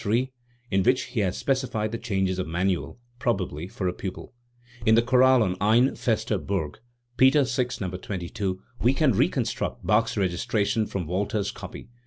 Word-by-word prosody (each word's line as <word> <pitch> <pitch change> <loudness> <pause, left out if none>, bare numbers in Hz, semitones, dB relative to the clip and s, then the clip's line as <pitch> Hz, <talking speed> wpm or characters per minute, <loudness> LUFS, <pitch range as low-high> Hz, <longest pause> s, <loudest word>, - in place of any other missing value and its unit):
3), 120 +5 +1 0.4
in 95 0 +3
which 125 +6 +3
he 120 - 0
has 95 -2 0
specified 130 -6 -1
the 115 - -2
changes 95 -2 -1
of 90 - -2
manual, 90 +6 -1 0.2
probably 90 -9 -1
for 100 -2 -3
a 90 - 0
pupil. 95 +6 -7 0.5
In 110 - +5
the 115 - +4
chorale 130 0 +5
on 90 -3 -1
"Ein' 115 +6 +4
feste 110 -5 -1
Burg" 80 -7 -2 0.4
(Peters 130 -2 +4
VI, 125 -2 +2
No. 95 -2 -2
22) 95 +1 -4 0.2
we 125 +3 +3
can 150 -2 +3
reconstruct 105 - -1
Bach's 110 +1 +2
registration 105 +3 0
from 95 -3 -3
Walther's 100 +4 -1
copy. - - -9
105 Hz, 165 wpm, -26 LUFS, 95-120 Hz, 0.5 s, In